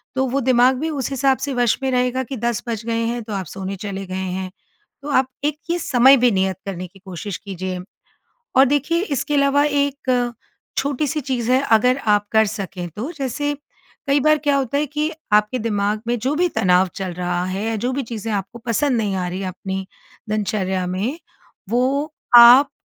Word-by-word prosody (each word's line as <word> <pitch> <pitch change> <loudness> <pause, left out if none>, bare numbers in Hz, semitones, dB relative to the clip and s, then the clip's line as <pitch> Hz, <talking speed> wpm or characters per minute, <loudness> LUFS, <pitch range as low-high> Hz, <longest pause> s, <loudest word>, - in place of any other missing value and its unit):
तो 265 0 +1
वो 275 +3 0
दिमाग 255 +1 +4
भी 320 +3 -2
उस 280 -5 -3
हिसाब 270 0 +2
से 280 - -3
वश 245 -2 +2
में 265 - 0
रहेगा 250 +1 +1
कि 265 - -3
10 235 - -1
बज 225 -1 -4
गए 230 0 -1
हैं 235 +1 -2
तो 215 -1 -7
आप 190 -2 -3
सोने 195 0 -5
चले 195 0 -5
गए 185 - -5
हैं। 190 0 -3 0.5
तो 295 - -6
आप 260 -2 +2 0.2
एक 300 0 0
ये 350 - 0
समय 265 -2 +5
भी 245 -1 +4
नियत 190 -1 0
करने 185 -2 -5
की 195 +2 -20
कोशिश 190 +1 -5
कीजिए। 185 -2 -5 0.8
और 270 - +8
देखिए 290 +5 +1
इसके 280 +2 -1
अलावा 280 0 +3
एक, 280 -4 0 0.5
छोटी 285 +1 0
सी 305 +2 -2
चीज़ 250 -2 -1
है 255 - +5
अगर 250 +4 +4
आप 210 0 +3
कर 220 0 +5
सकें 195 -4 -5
तो 265 +10 -4
जैसे, 290 +2 -2 0.5
कई 280 +1 +3
बार 305 +1 +4
क्या 290 -1 +1
होता 270 0 -1
है 300 - +1
कि 300 +2 -2 0.2
आपके 210 +4 +3
दिमाग 210 -1 -1
में 240 - +1
जो 265 +6 -1
भी 355 +2 +2
तनाव 185 -4 +3
चल 190 -2 -4
रहा 175 0 -2
है 190 +3 -3
या 225 0 -1
जो 255 - +1
भी 275 - -2
चीज़ें 225 -2 -5
आपको 200 +4 -4
पसंद 245 +2 +1
नहीं 205 -3 -1
आ 180 -1 -2
रही 185 +2 -5
है 190 - -3
अपनी 190 +1 -5 0.4
दिनचर्या 195 -3 -1
में, 215 - -2 0.5
वो 275 +6 0 0.2
आप 245 +4 +9
235 Hz, 200 wpm, -21 LUFS, 195-275 Hz, 0.8 s, आप